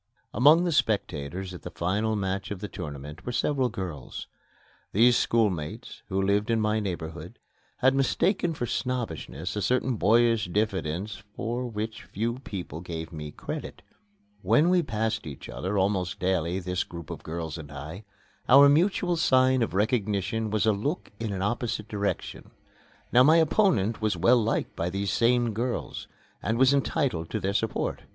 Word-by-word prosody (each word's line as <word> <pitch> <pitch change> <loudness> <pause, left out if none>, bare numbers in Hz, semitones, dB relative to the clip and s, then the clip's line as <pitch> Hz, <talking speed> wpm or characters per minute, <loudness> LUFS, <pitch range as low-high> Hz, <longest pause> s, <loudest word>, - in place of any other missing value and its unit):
Among 150 +9 +6
the 175 - +1
spectators 95 - -1
at 90 - -9
the - - -7
final 105 +6 -1
match 95 -1 -2
of 100 - -5
the 105 - -5
tournament 75 -4 -7
were 125 - -4
several 130 0 +1
girls. 90 - -6 0.7
These 120 +4 +5
schoolmates, 100 -13 0
who 95 - 0
lived 100 +2 +1
in 115 -1 +2
my 110 0 +1
neighborhood, 85 -5 -5 0.4
had 130 +1 +4
mistaken 170 +5 +1
for 120 - -2
snobbishness 90 - -3
a 105 - -1
certain 125 +4 +1
boyish 115 +1 +4
diffidence 100 0 -2
for 120 +2 -2
which 110 0 -4
few 115 +4 -3
people 90 - -6
gave 85 -1 -6
me 75 -1 -6
credit. - - -7 0.6
When 165 +4 +4
we 180 -1 +4
passed 110 - -2
each 70 - -8
other, 95 +3 -3
almost 95 -1 0
daily, 90 -2 0
this 90 -1 -1
group 85 -3 -9
of - - -7
girls 80 0 -5
and 75 -2 -9
I, 75 +8 -8 0.5
our 140 +3 +9
mutual 175 +3 +2
sign 130 -4 +4
of 115 - -1
recognition 105 0 0
was 110 0 +1
a 110 - +5
look 140 - -3
in 115 -2 -3
an 95 -1 -2
opposite 110 0 -2
direction. 100 -1 -3 0.6
Now 125 - +6
my 155 +5 +6
opponent 160 - +2
was 105 -4 0
well 115 +8 +5
liked 115 - -1
by 85 - -1
these 100 +1 -2
same 120 -1 +2
girls 120 +3 -3 0.3
and 110 +1 0
was 130 +2 +5
entitled 135 - 0
to - - -2
their 100 +1 -1
support. 110 +1 -1
105 Hz, 160 wpm, -27 LUFS, 90-120 Hz, 0.7 s, our